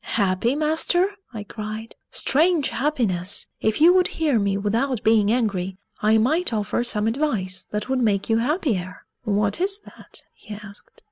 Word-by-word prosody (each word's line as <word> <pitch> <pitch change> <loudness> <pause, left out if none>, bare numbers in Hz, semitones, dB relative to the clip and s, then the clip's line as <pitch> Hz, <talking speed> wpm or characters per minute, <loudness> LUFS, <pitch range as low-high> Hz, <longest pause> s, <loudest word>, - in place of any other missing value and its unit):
"Happy, 200 +4 +1
master?" 320 +5 +2 0.2
I 220 -4 -6
cried. 215 +2 -7
"Strange 315 0 +2
happiness! 220 - 0
If 220 +4 0
you 335 +4 +7
would 365 -1 +4
hear 295 -8 0
me 200 -1 0
without 225 +4 -1
being 215 -2 +4
angry, 195 -6 -1 0.2
I 215 +1 +4
might 310 +10 +2
offer 215 +2 -1
some 215 -3 0
advice 225 -7 -1
that 210 +2 -3
would 260 -1 0
make 200 -4 +1
you 225 - +2
happier." 230 - -2 0.2
"What 205 +6 0
is 395 +2 0
that?" - - -10
he 210 - -10
asked. 205 -1 -12
225 Hz, 155 wpm, -23 LUFS, 205-290 Hz, 0.2 s, you